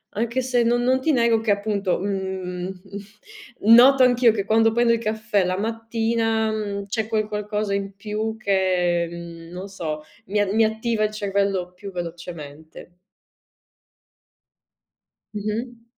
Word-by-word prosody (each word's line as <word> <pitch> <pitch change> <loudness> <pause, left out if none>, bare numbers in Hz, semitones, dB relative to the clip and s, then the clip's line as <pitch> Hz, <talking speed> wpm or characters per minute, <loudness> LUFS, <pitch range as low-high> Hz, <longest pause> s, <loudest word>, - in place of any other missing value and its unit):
Anche 235 +4 -1
se 250 -1 +1
non 240 +1 +2
non 260 +1 +2
ti 315 +4 +2
nego 235 -3 +3
che 220 -1 0
appunto, 200 -2 0
mhmm, 190 -2 -3
mhmm, 210 - -1
noto 265 +3 +7
anch'io 245 -2 +5
che 205 -3 -2
quando 225 +1 +4
prendo 235 +1 +3
il 230 - 0
caffè 215 -3 0
la 185 0 0
mattina, 225 0 0
mhmm, 205 -2 -3
c'è 220 +1 -2
quel 215 -1 0
qualcosa 210 -1 -2
in 195 0 -4
più 215 +2 -3
che, 185 -4 +1
mhmm, 170 -1 -9
non 185 +2 -7
so, 160 -6 -5 0.3
mi 205 +2 0
a 205 -2 +1
mi 220 +2 +3
attiva 220 0 0
il 215 - +1
cervello 195 -3 -1
più 200 +2 -8
velocemente. 165 -3 -8 2.5
Mh-mh. 225 +3 -4
210 Hz, 145 wpm, -23 LUFS, 190-225 Hz, 2.5 s, noto